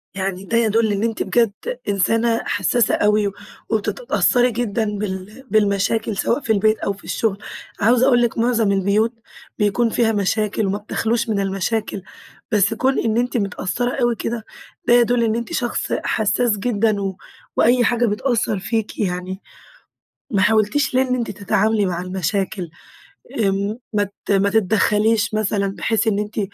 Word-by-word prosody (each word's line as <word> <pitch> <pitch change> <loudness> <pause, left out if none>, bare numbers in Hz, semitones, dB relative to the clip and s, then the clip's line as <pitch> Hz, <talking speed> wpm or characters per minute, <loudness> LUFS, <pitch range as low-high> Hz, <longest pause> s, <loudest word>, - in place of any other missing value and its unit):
يعني 190 -1 -3
ده 230 +4 0
يدل 225 -1 +2
إن 200 +1 -1
أنتِ 230 -1 -1
بجد 230 -3 +2 0.4
إنسانة 225 +4 +1
حسَّاسة 205 +4 +1
أوي، 210 -1 +2 0.4
وبتتأثري 245 - +1
جدًا 230 -1 -1
بال 200 +4 -6
بالمشاكل 210 +1 +1
سواء 235 - +1
في 225 - +1
البيت، 215 +1 +2
أو 200 - -1
في 200 - -17
الشغل، 215 -4 -1 0.4
عاوزة 240 +4 +4
أقول 245 -3 +4
لِك 240 -1 0
معظم 230 -3 +2
البيوت 200 +4 +1 0.5
بيكون 210 +3 +2
فيها 225 0 +2
مشاكل، 210 +1 0
وما 195 +1 -1
بتخلاش 230 +2 -1
من 210 -2 0
المشاكل، 195 +2 -2 0.5
بس 210 0 +3
كون 260 +4 +1
إن 225 0 0
أنتِ 245 +1 0
متأثرة 210 +3 -2
أوي 240 -1 +2
كده، 225 0 -4 0.4
ده - - +5
يدل 240 0 +4
إن 220 -1 +1
أنتِ 235 +8 -4
شخص 240 -7 -2
حسَّاس 220 +1 +1
جدًا 215 -1 0
و 195 -1 -3 0.4
وأي 245 +1 +4
حاجة 240 +1 +2
بتأثر 215 -1 0
فيكِ 210 +2 -3
يعني، 185 -1 -3 0.9
ما 200 -5 +1
حاولتيش 220 +8 +2
ليه 260 - +4
إن 250 - +1
أنتِ 240 -2 -2
تتعاملي 205 +1 +1
مع 175 -2 -2
المشاكل، 185 0 -2 0.7
آمم 200 +1 0
ما 205 -1 +2 0.2
ت - - +1
ما 200 0 +3
تتدخليش 215 +1 +2
مثلًا، 200 -2 0
بحيث 225 0 0
إن 210 -2 +1
أنتِ 210 +1 -3
215 Hz, 155 wpm, -20 LUFS, 200-230 Hz, 0.9 s, ده